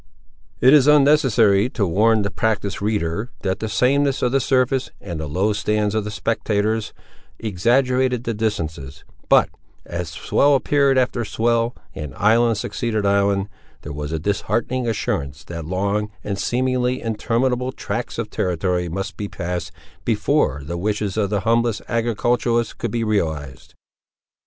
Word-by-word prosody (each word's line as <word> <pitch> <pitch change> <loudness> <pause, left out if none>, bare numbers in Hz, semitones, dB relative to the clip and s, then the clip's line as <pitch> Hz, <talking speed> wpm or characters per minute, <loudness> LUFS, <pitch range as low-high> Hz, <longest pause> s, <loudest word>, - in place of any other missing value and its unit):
It 130 +3 +7
is 145 -2 +6
unnecessary 130 -8 +4
to 110 -5 -1
warn 105 +5 +3
the 100 - -2
practised 105 -4 -1
reader, 105 +1 -1
that 95 -1 -1
the 110 - -3
sameness 135 +5 +2
of 125 - +2
the 135 - +3
surface, 130 0 +1
and 85 -2 -6
the 80 -2 -4
low 95 +8 +1
stands 105 0 0
of 110 -1 -1
the - - -3
spectators, 105 0 -1 0.5
exaggerated 125 +4 +1
the 115 - -2
distances; 80 -10 -3 0.3
but, - - +5 0.4
as 85 -1 -4
swell 140 - +2
appeared 140 0 +2
after 125 -2 +1
swell, 115 +2 0 0.2
and 75 -4 -7
island 115 +2 +3
succeeded 110 -1 -2
island, 100 0 +2 0.4
there 75 - -6
was 75 +1 -5
a 80 - -1
disheartening 110 +7 -1
assurance 70 -10 -2
that 85 -2 -7
long, 100 +4 -1
and 100 -1 -3
seemingly 125 0 0
interminable, 120 +3 -1
tracts - - -4
of - - -4
territory 90 0 -1
must 95 +3 -4
be 105 - -3
passed, 90 -3 -4 0.3
before 110 - +1
the 85 +3 -4
wishes 105 0 -1
of 105 -3 0
the 100 -2 0
humblest 115 0 +1
agriculturist 120 0 0
could 120 - -2
be 115 +2 -1
realised. 80 - -2
105 Hz, 145 wpm, -21 LUFS, 95-120 Hz, 0.5 s, It